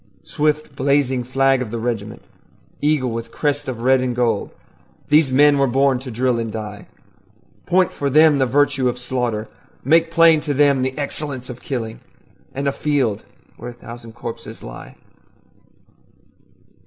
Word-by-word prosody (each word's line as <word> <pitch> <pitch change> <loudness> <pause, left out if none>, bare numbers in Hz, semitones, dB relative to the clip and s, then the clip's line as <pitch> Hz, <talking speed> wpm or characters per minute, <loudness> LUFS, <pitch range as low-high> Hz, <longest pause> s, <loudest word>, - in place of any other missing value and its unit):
Swift 150 -1 -1
blazing 135 -2 +1
flag 135 +1 +2
of 125 - -4
the 115 - -4
regiment, 115 -1 -4 0.6
Eagle 145 -4 +1
with 115 0 -5
crest 145 -1 -1
of 120 -3 -5
red 130 +1 +3
and 125 -1 -2
gold, 115 -4 0 0.6
These 150 -2 +4
men 145 +2 +5
were 135 - +3
born 135 +1 +2
to 130 0 -8
drill 125 +1 0
and 115 -1 -3
die. 105 -1 -7 0.8
Point 180 0 +2
for 140 - -2
them 155 +1 +5
the 130 - +2
virtue 135 0 +2
of 125 - -4
slaughter, 120 -4 -2 0.4
Make 165 +4 +3
plain 165 -1 +5
to 145 -2 -2
them 140 -1 +3
the 130 +1 -2
excellence 140 -3 -4
of 125 - -11
killing 120 -7 -4 0.5
And 140 +1 -3
a - - +2
field 135 -8 0 0.4
where 120 - -7
a - - -9
thousand 115 -1 -11
corpses 115 0 -8
lie. - - -10
130 Hz, 155 wpm, -20 LUFS, 120-145 Hz, 0.8 s, men